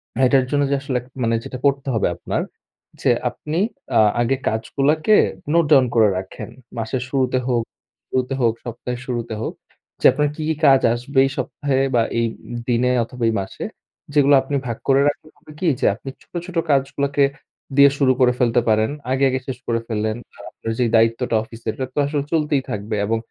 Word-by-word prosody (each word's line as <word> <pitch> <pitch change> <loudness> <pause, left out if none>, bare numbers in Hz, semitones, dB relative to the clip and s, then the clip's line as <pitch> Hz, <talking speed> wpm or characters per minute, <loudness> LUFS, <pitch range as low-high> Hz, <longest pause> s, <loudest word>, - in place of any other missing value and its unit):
হ্যাঁ, 130 +3 +3
এটার 135 -1 +4
জন্য 145 -1 +2
যে - - +3
আসলে, 135 -3 -1 0.2
মানে 115 0 +2
যেটা 130 - -6
করতে 140 0 +1
হবে 110 - +1
আপনার - - -3 0.6
যে, - - +2 0.2
আপনি 155 +2 -5 0.4
আ - - +6 0.2
আগে 120 +3 +2
কাজগুলাকে 145 - +2 0.4
নোট 170 -1 +4
ডাউন 135 -3 +7
করে 110 -2 +6
রাখেন। 95 0 -7 0.3
মাসের 115 +3 -2
শুরুতে 130 -1 +1
হোক 120 -2 +1 0.5
শুরুতে 130 +1 -1
হোক, 115 -2 +3
সপ্তাহের 120 +1 -5
শুরুতে 120 -3 -3
হোক - - -3 0.5
যে - - -2
আপনার 150 0 +1
কি, 155 - -6
কি 160 - +1
কাজ 135 -2 +6
আসবে 125 +4 -6
এই 135 - -1
সপ্তাহে 135 +1 -1 0.2
বা, 120 - +4 0.2
এই 115 - +2 0.3
ই - - -4
দিনে 125 +1 +2
অথবা, 125 +1 -7
এই - - 0
মাসে 95 - -7 0.5
যেগুলো 145 -1 +5
আপনি 135 +2 -4
ভাগ 115 -1 -3
করে 135 0 +4
রাখলে 150 +1 -3
হবে 155 - -16
কি? 185 - 0
যে - - 0
আপনি 130 +4 -9
ছোট, - - -35
ছোট 180 -1 -6
কাজগুলাকে 140 +1 +1 0.5
দিয়ে 140 0 +8
শুরু 135 -2 +4
করে 125 -1 +4
ফেলতে 120 0 +3
পারেন। 110 0 +3 0.2
আগে, 135 +1 +1
আগে 130 0 -1
শেষ 130 -2 -4
করে 115 -1 +1
ফেললেন। 110 0 -1 0.2
আর - - -12
আপনার 115 - -5
যে 125 - +3
দায়িত্বটা 115 +1 +2
অফিসের, 115 0 -6
এটা 130 - -2
তো - - -18
আসলে 145 0 -1
চলতেই 150 -3 +2
থাকবে। 105 +2 -3
এবং 115 +2 0
130 Hz, 195 wpm, -21 LUFS, 115-140 Hz, 0.6 s, দিয়ে